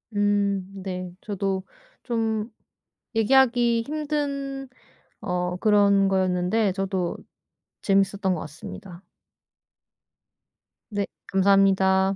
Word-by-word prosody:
음 205 Hz, -2 st, +1 dB, 0.2 s
네. 185 Hz, -2 st, -5 dB
저도 195 Hz, -2 st, -2 dB, 0.4 s
좀 225 Hz, -2 st, -1 dB, 0.7 s
얘기하기 235 Hz, 0 st, +4 dB
힘든 280 Hz, -3 st, -3 dB, 0.5 s
어 180 Hz, 0 st, -2 dB
그런 200 Hz, -1 st, +4 dB
거였는데 185 Hz, +2 st, +1 dB
저도 190 Hz, -2 st, -2 dB, 0.7 s
재미있었던 195 Hz, -1 st, +2 dB
것 160 Hz, -, -4 dB
같습니다. 170 Hz, +4 st, -9 dB, 1.9 s
네. 205 Hz, -2 st, -1 dB, 0.2 s
감사합니다. 195 Hz, 0 st, +3 dB
200 Hz, 180 characters per minute, -25 LUFS, 190-225 Hz, 1.9 s, 얘기하기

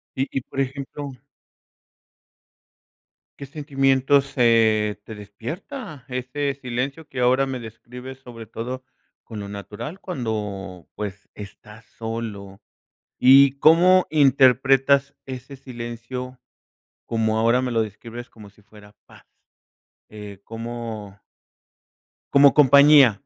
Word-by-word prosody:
Y 135 Hz, +1 st, -1 dB
y, 135 Hz, -, -2 dB
por 135 Hz, -, -8 dB
ejemplo 140 Hz, +1 st, -4 dB, 2.3 s
¿Qué 140 Hz, -, -8 dB
sentimientos, 140 Hz, -1 st, +1 dB
eh, 110 Hz, -4 st, +3 dB
te 110 Hz, -, -9 dB
despierta 145 Hz, -, -8 dB
ese 130 Hz, +3 st, -3 dB
silencio 135 Hz, +5 st, -4 dB
que 130 Hz, -3 st, -5 dB
ahora 130 Hz, +2 st, +3 dB
me 130 Hz, -2 st, -4 dB
describes, 125 Hz, +3 st, -10 dB
sobre 120 Hz, -3 st, -11 dB
todo 125 Hz, +4 st, -6 dB, 0.4 s
con 110 Hz, -2 st, -9 dB
lo 100 Hz, -, -6 dB
natural 105 Hz, -, -8 dB
cuando, 105 Hz, -, -5 dB
pues, 100 Hz, -2 st, -7 dB
estás 105 Hz, +2 st, -12 dB
solo? 110 Hz, -4 st, -7 dB, 0.6 s
¿Y 135 Hz, +1 st, +7 dB
cómo 175 Hz, +5 st, +5 dB
interpretas 135 Hz, -1 st, +4 dB
ese 130 Hz, +1 st, -8 dB
silencio, 125 Hz, 0 st, -7 dB, 0.7 s
como 110 Hz, -1 st, 0 dB
ahora 115 Hz, +3 st, +3 dB
me 130 Hz, -1 st, -2 dB
lo 115 Hz, -1 st, +2 dB
describes, 115 Hz, +3 st, -9 dB
como 105 Hz, -3 st, -14 dB
si 105 Hz, +1 st, -25 dB
fuera 105 Hz, 0 st, -18 dB
paz? -, -, -18 dB, 0.9 s
Eh, 105 Hz, -2 st, -10 dB
como 115 Hz, -3 st, -7 dB, 1.2 s
Como 140 Hz, 0 st, +7 dB
compañía 140 Hz, -1 st, +7 dB
125 Hz, 110 wpm, -23 LUFS, 110-135 Hz, 2.3 s, Y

